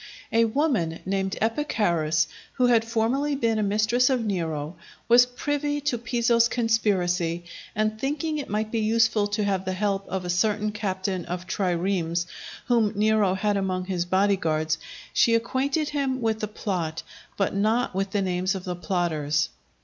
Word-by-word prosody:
A 230 Hz, 0 st, +5 dB
woman, 225 Hz, -, 0 dB
named 195 Hz, 0 st, -1 dB
Epicharis, 180 Hz, -, +1 dB, 0.3 s
who 250 Hz, -, +2 dB
had 235 Hz, -2 st, +4 dB
formerly 240 Hz, +6 st, 0 dB
been 230 Hz, -4 st, +1 dB
a -, -, +1 dB
mistress 215 Hz, +5 st, +2 dB
of 250 Hz, -4 st, +1 dB
Nero, 165 Hz, -5 st, -2 dB, 0.3 s
was 240 Hz, +1 st, +7 dB
privy 290 Hz, +3 st, -2 dB
to 270 Hz, -5 st, -1 dB
Piso's 235 Hz, 0 st, +2 dB
conspiracy, 185 Hz, -8 st, +1 dB, 0.3 s
and 215 Hz, +1 st, -1 dB
thinking 300 Hz, +3 st, -1 dB
it 280 Hz, -, -6 dB
might 215 Hz, +1 st, -1 dB
be 230 Hz, -, 0 dB
useful 220 Hz, -1 st, +2 dB
to 210 Hz, +1 st, -1 dB
have 195 Hz, -2 st, 0 dB
the 185 Hz, 0 st, -2 dB
help 195 Hz, 0 st, -1 dB
of 185 Hz, 0 st, -3 dB
a -, -, -4 dB
certain 210 Hz, +3 st, +1 dB
captain 190 Hz, -3 st, -2 dB
of 180 Hz, +1 st, -5 dB
triremes 175 Hz, -2 st, 0 dB, 0.4 s
whom 230 Hz, -3 st, +2 dB
Nero 210 Hz, -2 st, +3 dB
had 205 Hz, +1 st, 0 dB
among 185 Hz, -2 st, -1 dB
his 180 Hz, -2 st, -1 dB
body 195 Hz, +2 st, +2 dB
guards, 160 Hz, -1 st, 0 dB, 0.3 s
she 230 Hz, -, +4 dB
acquainted 270 Hz, +6 st, 0 dB
him 275 Hz, -3 st, -1 dB
with 225 Hz, -2 st, 0 dB
the 215 Hz, -, -2 dB
plot, 180 Hz, -7 st, -3 dB, 0.3 s
but 195 Hz, -, 0 dB
not 220 Hz, +4 st, +1 dB
with 195 Hz, +1 st, -1 dB
the 200 Hz, 0 st, 0 dB
names 185 Hz, +1 st, 0 dB
of 190 Hz, -, -5 dB
the 180 Hz, -1 st, -3 dB
plotters. 155 Hz, -3 st, 0 dB
210 Hz, 165 wpm, -25 LUFS, 185-230 Hz, 0.4 s, was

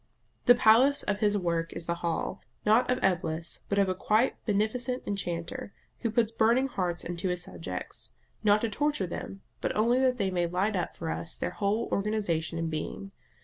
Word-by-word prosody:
The 245 Hz, -, +8 dB
palace 245 Hz, +4 st, +5 dB
of 205 Hz, 0 st, -1 dB
his 210 Hz, -1 st, +2 dB
work 170 Hz, -3 st, -1 dB
is 165 Hz, -, -6 dB
the 170 Hz, -, 0 dB
hall, 170 Hz, -2 st, -2 dB, 0.2 s
not 220 Hz, +4 st, +4 dB
of 250 Hz, -, +3 dB
Eblis, 170 Hz, -3 st, 0 dB
but 200 Hz, -, 0 dB
of 200 Hz, -1 st, +4 dB
a 185 Hz, -, +1 dB
quite 215 Hz, +6 st, +1 dB
beneficent 235 Hz, +5 st, 0 dB
enchanter, 175 Hz, -2 st, -3 dB, 0.3 s
who 230 Hz, -, -1 dB
puts 225 Hz, 0 st, +2 dB
burning 235 Hz, +4 st, +3 dB
hearts 180 Hz, -7 st, -2 dB
into 175 Hz, +2 st, -2 dB
his 180 Hz, 0 st, -2 dB
subjects, 90 Hz, -, -6 dB, 0.3 s
not 210 Hz, 0 st, +5 dB
to 230 Hz, -, 0 dB
torture 290 Hz, -2 st, 0 dB
them, 195 Hz, +2 st, -6 dB, 0.2 s
but -, -, -1 dB
only 235 Hz, +4 st, +3 dB
that 255 Hz, -1 st, +3 dB
they 195 Hz, -4 st, 0 dB
may 175 Hz, -1 st, +1 dB
light 190 Hz, +5 st, 0 dB
up 180 Hz, -, -2 dB
for 160 Hz, -1 st, -3 dB
us 165 Hz, -, -4 dB
their -, -, -3 dB
whole 210 Hz, +3 st, 0 dB
organisation 195 Hz, -6 st, 0 dB
and 165 Hz, -1 st, -2 dB
being. 175 Hz, +5 st, -4 dB
200 Hz, 190 wpm, -29 LUFS, 175-225 Hz, 0.3 s, The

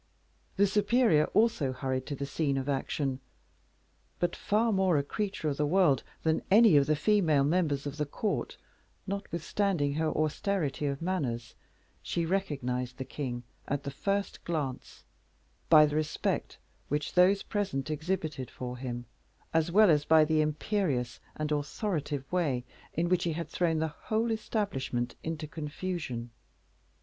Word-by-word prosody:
The 200 Hz, -, +5 dB
superior 210 Hz, -5 st, +3 dB
also 200 Hz, -, +2 dB
hurried 130 Hz, 0 st, -2 dB
to 145 Hz, -, -3 dB
the 140 Hz, -, -3 dB
scene 140 Hz, -1 st, 0 dB
of 135 Hz, 0 st, -2 dB
action, 135 Hz, -1 st, -1 dB, 1.0 s
but 175 Hz, -, 0 dB
far 225 Hz, +3 st, +1 dB
more 190 Hz, -4 st, +3 dB
a 140 Hz, -, +1 dB
creature 195 Hz, +1 st, -3 dB
of 140 Hz, -2 st, -1 dB
the 150 Hz, -, +1 dB
world 165 Hz, -6 st, +4 dB, 0.2 s
than 160 Hz, -1 st, +2 dB
any 215 Hz, -3 st, +7 dB
of 140 Hz, -1 st, +5 dB
the 155 Hz, -, +3 dB
female 160 Hz, -4 st, +3 dB
members 145 Hz, -2 st, +1 dB
of 145 Hz, 0 st, -5 dB
the 150 Hz, -1 st, -1 dB
court, 210 Hz, +8 st, -2 dB, 0.5 s
notwithstanding 190 Hz, -4 st, -1 dB
her 160 Hz, +2 st, 0 dB
austerity 155 Hz, -2 st, -1 dB
of 140 Hz, +3 st, -3 dB
manners, 135 Hz, -11 st, -2 dB, 0.5 s
she 170 Hz, -, -1 dB
recognized 130 Hz, -9 st, -2 dB
the 130 Hz, -, -4 dB
king 125 Hz, -4 st, -4 dB, 0.2 s
at 145 Hz, 0 st, -2 dB
the 140 Hz, -, -4 dB
first 200 Hz, +7 st, -2 dB
glance, 145 Hz, -6 st, -4 dB, 0.7 s
by 155 Hz, -2 st, +9 dB
the 150 Hz, 0 st, -2 dB
respect 155 Hz, 0 st, -1 dB, 0.3 s
which 150 Hz, +1 st, -2 dB
those 190 Hz, +2 st, +5 dB
present 155 Hz, -9 st, -2 dB
exhibited 155 Hz, -4 st, -2 dB
for 125 Hz, 0 st, -6 dB
him, 120 Hz, -1 st, -5 dB, 0.5 s
as 165 Hz, +1 st, +2 dB
well 210 Hz, 0 st, +6 dB
as 150 Hz, -1 st, +3 dB
by 160 Hz, 0 st, +6 dB
the 155 Hz, 0 st, +2 dB
imperious 150 Hz, -, -1 dB, 0.2 s
and 155 Hz, 0 st, -3 dB
authoritative 145 Hz, -1 st, -2 dB
way 150 Hz, -9 st, +1 dB, 0.3 s
in 170 Hz, +2 st, +1 dB
which 180 Hz, 0 st, +2 dB
he 170 Hz, -, 0 dB
had 165 Hz, +1 st, -4 dB
thrown 165 Hz, -3 st, +1 dB
the 160 Hz, 0 st, 0 dB, 0.2 s
whole 225 Hz, +1 st, +1 dB
establishment 190 Hz, -, -2 dB
into 160 Hz, -1 st, -4 dB
confusion. 150 Hz, -5 st, -4 dB
155 Hz, 150 wpm, -30 LUFS, 140-185 Hz, 1.0 s, by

